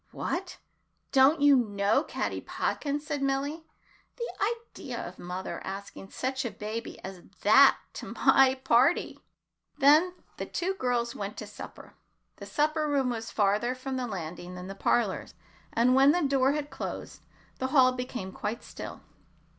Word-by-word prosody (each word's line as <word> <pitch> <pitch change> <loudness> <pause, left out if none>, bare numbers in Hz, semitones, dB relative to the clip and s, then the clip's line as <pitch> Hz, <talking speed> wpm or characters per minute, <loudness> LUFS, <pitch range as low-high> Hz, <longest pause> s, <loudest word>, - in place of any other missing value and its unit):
"What! 365 +1 -4 0.5
don't 275 +3 +5
you 290 -1 +7
know 205 +2 +2
Caddy - - -3
Podkins?" 290 0 -2
said 290 -2 -3
Milly. 280 +4 -1 0.5
"The 470 -2 -1 0.2
idea - - -6
of - - -11
mother 180 +1 -5
asking 195 0 -7
such 260 +1 -2
a 235 - -2
baby 215 +3 -6
as 190 -2 -8 0.2
that 270 +7 +7 0.2
to - - -7
my 265 -1 +5
party!" 265 +6 +3 0.6
Then 310 +6 +5 0.2
the - - -4
two 365 +2 -1
girls 245 -7 -1
went 200 +1 -5
to - - -5
supper. 205 0 -11 0.4
The - - -9
supper 305 +1 +1
room 275 -4 +1
was 225 -1 -4
farther 210 +4 +1
from 260 +1 -5
the 250 -1 -2
landing 180 -2 -6
than 180 0 -7
the 195 - -6
parlors, 200 +1 0 0.4
and 240 +2 +3
when 270 +2 +6
the 355 -1 +1
door 270 -1 +3
had 295 -1 -3
closed, - - -6 0.4
the 260 - 0
hall 260 -2 +5
became 250 -6 -5
quite 210 +4 -4
still. - - -8
255 Hz, 155 wpm, -28 LUFS, 210-285 Hz, 0.6 s, you